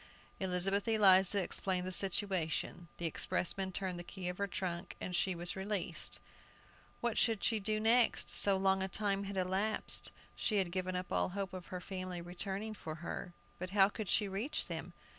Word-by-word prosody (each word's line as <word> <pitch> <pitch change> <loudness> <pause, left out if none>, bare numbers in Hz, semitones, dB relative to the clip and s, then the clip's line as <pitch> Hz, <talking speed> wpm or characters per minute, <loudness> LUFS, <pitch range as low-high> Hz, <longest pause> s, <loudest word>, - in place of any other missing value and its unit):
Elizabeth 190 +2 +1
Eliza 195 -3 +6
explained 180 0 0
the 185 - -3
situation. 185 -3 0
The 170 - -4
expressman 190 +4 0
turned 185 -2 -3
the - - -5
key 180 0 -5
of 180 - -6
her 200 - 0
trunk, 180 -3 -4
and 180 - -3
she 185 +1 +1
was 175 +1 -3
released! 190 -3 -1 0.8
What 235 -2 0
should 225 -3 +2
she 225 -2 +2
do 215 +1 0
next? 230 +2 +4
So 200 -1 +3
long 190 0 +2
a 190 - 0
time 200 0 -1
had 200 0 -5
elapsed, 190 +4 0 0.3
she 215 - 0
had 185 -3 0
given 185 0 -2
up 180 0 -4
all - - +1
hope 195 +1 -4
of 185 -2 -7
her 180 - -5
family 185 -1 -5
returning 190 +5 -3
for 160 -6 -7
her. 175 - -5 0.3
But 185 +1 -4
how 195 0 +7
could 210 -1 -5
she 210 - +3
reach 200 +9 -1
them? - - -6
190 Hz, 180 wpm, -34 LUFS, 180-200 Hz, 0.8 s, how